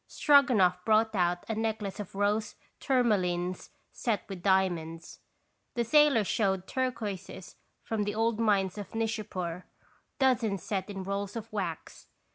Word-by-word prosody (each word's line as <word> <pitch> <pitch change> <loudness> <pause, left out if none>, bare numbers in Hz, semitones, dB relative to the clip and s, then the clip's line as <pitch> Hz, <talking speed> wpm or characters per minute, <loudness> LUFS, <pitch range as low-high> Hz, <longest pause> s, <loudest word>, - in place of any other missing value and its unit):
Stroganoff 230 - +4
brought 220 +1 +3
out 175 -2 0
a 225 - -1
necklace 220 -2 -3
of 200 -2 -7
rose 210 +2 0 0.2
tourmalines 185 -9 0 0.2
set 225 -4 -2
with 195 -3 -7
diamonds. 175 -4 0 0.6
The 235 - +1
sailor 290 -1 +5
showed 190 -2 0
turquoises 215 -8 -4 0.3
from 225 -2 -2
the 205 0 -2
old 225 0 +1
mines 200 -3 +1
of 205 - -8
Nishapur, 190 -6 -3 0.5
dozens 235 - +1
set 195 -3 -3
in 195 -2 -5
rolls 200 +2 -3
of 225 -1 -7
wax. 180 -6 -5
205 Hz, 130 wpm, -29 LUFS, 185-225 Hz, 0.6 s, sailor